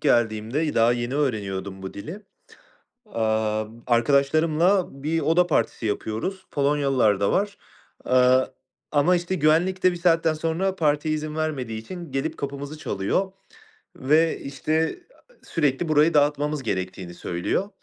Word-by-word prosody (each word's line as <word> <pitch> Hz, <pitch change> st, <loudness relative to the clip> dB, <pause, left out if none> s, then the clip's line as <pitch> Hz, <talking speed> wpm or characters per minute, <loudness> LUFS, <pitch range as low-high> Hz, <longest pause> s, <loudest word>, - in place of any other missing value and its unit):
geldiğimde, 120 Hz, +6 st, +1 dB
daha 115 Hz, +1 st, +4 dB
yeni 120 Hz, +2 st, -3 dB
öğreniyordum 100 Hz, -8 st, -2 dB
bu 95 Hz, -, -7 dB
dili, 160 Hz, -, -8 dB, 0.8 s
aaa, 110 Hz, -, 0 dB
b 115 Hz, +2 st, -15 dB
arkadaşlarımla 155 Hz, -, +3 dB, 0.2 s
bir 160 Hz, +2 st, 0 dB
oda 175 Hz, +3 st, +3 dB
partisi 150 Hz, -7 st, 0 dB
yapıyoruz. 110 Hz, -, -3 dB
Polonyalılar 135 Hz, -8 st, +2 dB
da 100 Hz, -, +2 dB
var, 200 Hz, +1 st, 0 dB, 0.5 s
aaa, 130 Hz, 0 st, +4 dB, 0.5 s
ama 155 Hz, +5 st, +4 dB
işte 175 Hz, +2 st, -2 dB
güvenlik 170 Hz, +4 st, +2 dB
de 185 Hz, -, +5 dB
bir -, -, -5 dB
saatten 165 Hz, -2 st, +2 dB
sonra 165 Hz, +5 st, -1 dB
partiye 155 Hz, -1 st, +1 dB
izin 155 Hz, 0 st, -4 dB
vermediği 135 Hz, -8 st, -2 dB
için 170 Hz, +3 st, -9 dB
gelip 135 Hz, 0 st, -2 dB
kapımızı 140 Hz, +2 st, -6 dB
çalıyor 170 Hz, -, -1 dB, 0.6 s
ve 155 Hz, +4 st, +2 dB
işte, 155 Hz, -, -1 dB, 0.3 s
aaa, -, -, -23 dB
sürekli 150 Hz, +1 st, 0 dB
burayı 155 Hz, +2 st, +4 dB
dağıtmamız 145 Hz, 0 st, +1 dB
gerektiğini 95 Hz, -4 st, -4 dB
söylüyor. 85 Hz, -, -2 dB
145 Hz, 130 wpm, -24 LUFS, 115-165 Hz, 0.8 s, de